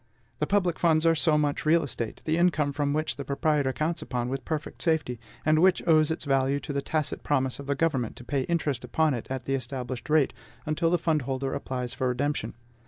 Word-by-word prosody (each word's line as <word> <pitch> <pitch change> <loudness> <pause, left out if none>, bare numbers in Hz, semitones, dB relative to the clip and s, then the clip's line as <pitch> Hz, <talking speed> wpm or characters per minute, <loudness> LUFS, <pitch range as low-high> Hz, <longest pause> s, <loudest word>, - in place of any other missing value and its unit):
The - - 0
public 180 -5 +1
funds 160 -1 +3
are 165 - +6
so 155 -1 +3
much 145 -1 0
real 165 +2 +4
estate, 120 -4 -5
the 155 - +1
income 165 -4 +2
from 145 0 0
which 155 +2 -1
the 140 - -4
proprietor 140 0 +1
counts 155 +5 -2
upon 125 -1 -3
with 135 +1 -3
perfect 155 -2 -4
safety, 155 -8 0 0.3
and 155 0 +4
which 185 +1 +3
owes 155 -2 +5
its 160 -1 -3
value 135 0 +2
to 145 - -5
the 140 - 0
tacit 155 0 -2
promise 130 -3 0
of 140 - -8
the 140 - +1
government 135 -7 0
to - - -10
pay 140 +2 -1
interest 150 -7 -1
upon 155 +5 +1
it 120 - -4
at 130 -1 -4
the 135 - -1
established 130 0 -4
rate, 150 -3 +3 0.3
until 160 +2 +1
the 175 - +3
fund 160 -3 +1
holder 135 +1 -2
applies 125 -2 -3
for 130 - -1
redemption. 125 -2 -1
145 Hz, 220 wpm, -27 LUFS, 130-160 Hz, 0.3 s, are